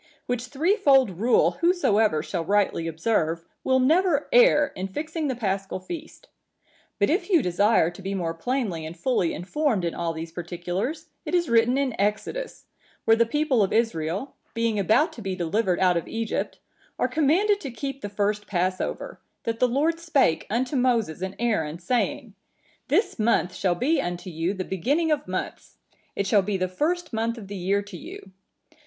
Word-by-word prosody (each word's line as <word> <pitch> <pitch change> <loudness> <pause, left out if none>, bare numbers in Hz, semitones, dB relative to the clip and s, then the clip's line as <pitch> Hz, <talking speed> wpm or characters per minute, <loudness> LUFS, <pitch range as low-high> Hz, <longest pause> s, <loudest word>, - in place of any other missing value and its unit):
Which 245 0 -2
threefold 280 - +3
rule 235 +3 +3
whosoever 220 - +3
shall 175 -4 -3
rightly 195 -3 +1
observe, 165 -1 0 0.2
will 260 - +3
never 310 +2 +3
err 485 -13 +5
in 185 +1 -3
fixing 310 - -3
the 260 - -1
Paschal 195 -4 -2
feast. 315 - -9 0.7
But 200 - +2
if 355 +2 0
you 340 -9 +4
desire 180 -1 +3
to 175 - -12
be 195 +1 -3
more 170 -3 -2
plainly 195 -2 -2
and 160 +2 -7
fully 185 -4 +1
informed 215 - 0
in 170 - -1
all 170 -1 -2
these 165 0 -6
particulars, 175 - -4
it - - -2
is 345 -2 +1
written 235 +2 +4
in 275 -3 0
Exodus, 215 - -2 0.4
where 225 - +6
the 230 0 +3
people 295 -2 +1
of 195 - +1
Israel, 205 - -1 0.2
being 230 -2 0
about 295 - +3
to 235 - -10
be 190 -2 -3
delivered 185 +2 0
out 180 -2 +4
of 170 - -3
Egypt, 225 -1 -3 0.4
are - - +1
commanded 355 +8 +2
to 275 - -5
keep 275 +2 -5
the 205 - -4
first 205 +1 -1
Passover,(953) 185 -1 -3
that 230 0 -2
the 250 - +4
Lord 305 +7 +1
spake 280 - +2
unto 250 +6 -1
Moses 235 - +1
and 190 +1 -4
Aaron, 170 -10 0
saying, 235 +8 -1 0.5
'This 400 - +1
month 215 -4 +2
shall 180 -3 0
be 280 - +1
unto 175 +1 -5
you 165 +4 -1
the 185 -1 -4
beginning 285 - 0
of 295 -1 0
months; - - -5 0.4
it 200 - -1
shall 200 +1 +4
be 195 +1 -1
the 185 0 0
first 320 - -2
month 230 +1 -1
of 210 -4 -9
the 200 - -6
year 195 +2 0
to 200 -3 -9
you. 195 - -10
220 Hz, 175 wpm, -25 LUFS, 185-280 Hz, 0.7 s, where